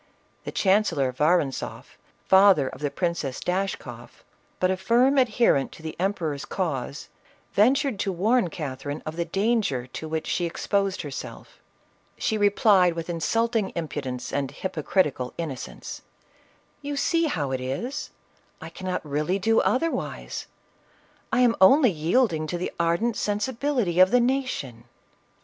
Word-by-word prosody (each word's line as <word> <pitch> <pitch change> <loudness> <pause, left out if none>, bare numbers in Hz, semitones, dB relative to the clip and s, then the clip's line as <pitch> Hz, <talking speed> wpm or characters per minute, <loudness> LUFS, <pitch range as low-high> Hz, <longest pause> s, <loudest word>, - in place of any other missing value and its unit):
The - - -4
chancellor 190 -10 +2
Vorontzoflj 150 0 0 0.4
father 190 -7 +6
of 130 - -8
the 145 - 0
Princess 170 -6 -2
Dash 190 +2 -1
koff, - - -12 0.4
but 185 0 +2
a - - +1
firm 245 +8 +3
adherent 230 - +2
to 160 - -14
the 160 - -5
emperor's 170 -7 -1
cause, 145 -6 -4 0.4
ven 225 +7 +5
tured 275 -7 -1
to 195 - 0
warn 210 +3 +2
Catherine 145 -2 -5
of 155 - -5
the 170 0 -1
danger 195 - 0
to 145 +5 -7
which 160 0 -2
she 175 - -1
exposed 195 +2 -1
herself. 145 -3 -8 0.6
She 220 - 0
replied 205 -3 +4
with 165 +1 -4
insulting 220 +6 0
impudence 140 -6 -4
and 140 -2 -1
hypocritical 150 -4 -1
innocence, 155 -6 -6 0.8
"You 285 0 -4
see 335 +3 +2
how 150 - -1
it 130 -1 -2
is; 140 - -4 0.5
I - - -9 0.3
really 150 +5 -1
cannot - - -15
do 225 +1 +4
otherwise; 330 +6 -2 0.8
I 255 -1 +3
am 240 -2 +4
only 255 +5 +7
yielding 165 0 +1
to 175 - -3
the 180 - -3
ardent 170 +8 +1
sensibility 220 -2 -1
of 185 0 +7
the 250 - +4
nation 240 - -2
185 Hz, 140 wpm, -25 LUFS, 150-225 Hz, 0.8 s, only